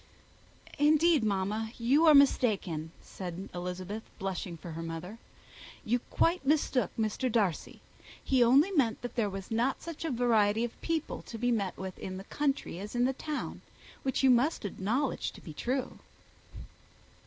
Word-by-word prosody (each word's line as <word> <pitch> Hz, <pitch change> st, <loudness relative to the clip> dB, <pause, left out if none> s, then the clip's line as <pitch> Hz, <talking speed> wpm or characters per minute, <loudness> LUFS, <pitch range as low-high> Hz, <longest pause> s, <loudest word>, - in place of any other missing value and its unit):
"Indeed, 310 Hz, -1 st, +4 dB
mamma, 210 Hz, +2 st, -1 dB
you 275 Hz, +8 st, +4 dB
are 305 Hz, -, +8 dB
mistaken," 200 Hz, -, +3 dB
said 185 Hz, +1 st, -7 dB
Elizabeth, 180 Hz, +4 st, -5 dB, 0.2 s
blushing 185 Hz, -2 st, -4 dB
for 170 Hz, +1 st, -9 dB
her 165 Hz, +1 st, -5 dB
mother. 165 Hz, +6 st, -6 dB, 0.7 s
"You 245 Hz, +3 st, +2 dB
quite 340 Hz, 0 st, +2 dB
mistook 270 Hz, -, +2 dB
Mr. 225 Hz, +3 st, 0 dB
Darcy. 205 Hz, -8 st, -1 dB, 0.4 s
He 260 Hz, -2 st, +4 dB
only 275 Hz, +10 st, +5 dB
meant 255 Hz, -, +1 dB
that 245 Hz, -, -5 dB
there 225 Hz, -4 st, +1 dB
was 195 Hz, +1 st, -7 dB
not 240 Hz, +4 st, +1 dB
such 335 Hz, -2 st, -6 dB
a 325 Hz, -, -1 dB
variety 230 Hz, -4 st, +2 dB
of 240 Hz, -, -5 dB
people 325 Hz, -2 st, -2 dB
to 230 Hz, -, -6 dB
be 245 Hz, +2 st, +1 dB
met 200 Hz, -6 st, -1 dB
with 190 Hz, -1 st, -6 dB
in 185 Hz, 0 st, -5 dB
the 190 Hz, -, -7 dB
country 275 Hz, -, -2 dB
as 210 Hz, +4 st, -7 dB
in 245 Hz, +2 st, +2 dB
town, 300 Hz, +2 st, -5 dB, 0.4 s
which 265 Hz, 0 st, -1 dB
you 265 Hz, -, +7 dB
must 250 Hz, +2 st, +2 dB
acknowledge 225 Hz, +8 st, -1 dB
to -, -, -12 dB
be 160 Hz, -, -9 dB
true." 255 Hz, -, -3 dB
230 Hz, 155 wpm, -30 LUFS, 190-270 Hz, 0.7 s, are